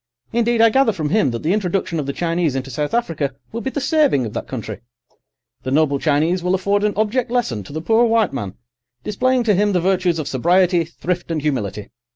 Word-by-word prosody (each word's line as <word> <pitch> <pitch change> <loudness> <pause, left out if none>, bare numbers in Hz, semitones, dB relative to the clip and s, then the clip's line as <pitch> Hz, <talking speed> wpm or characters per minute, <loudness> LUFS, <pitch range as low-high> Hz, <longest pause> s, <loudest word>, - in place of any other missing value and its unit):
Indeed, 235 0 +2
I 230 -1 +6
gather 265 -2 +3
from 155 -6 -3
him 190 -5 +2
that 115 -1 -5
the 165 +4 +1
introduction 185 -4 -1
of 140 - -3
the - - 0
Chinese 165 -2 -1
into 135 0 -4
South 145 +4 -2
Africa 155 - -1 0.2
will 230 - -4
be 265 - -2
the 285 - -3
saving 285 - +2
of 110 - -6
that - - -5
country. 110 -5 -6 0.8
The 130 - -5
noble 140 0 +2
Chinese 160 +5 +1
will 180 +1 +1
afford 200 +2 0
an 210 -1 +1
object 220 +4 0
lesson 230 - -1
to - - -11
the 155 +2 -4
poor 225 +5 +3
white 225 -6 +2
man, 100 -8 -5 0.5
displaying 250 +4 +1
to 220 -3 +3
him 205 +2 +2
the 180 - +2
virtues 180 -1 +1
of 155 -3 -3
sobriety, 175 +5 +2
thrift, 175 +2 -4
and 165 -2 -1
humility. 110 -9 -3
180 Hz, 215 wpm, -20 LUFS, 145-215 Hz, 0.8 s, I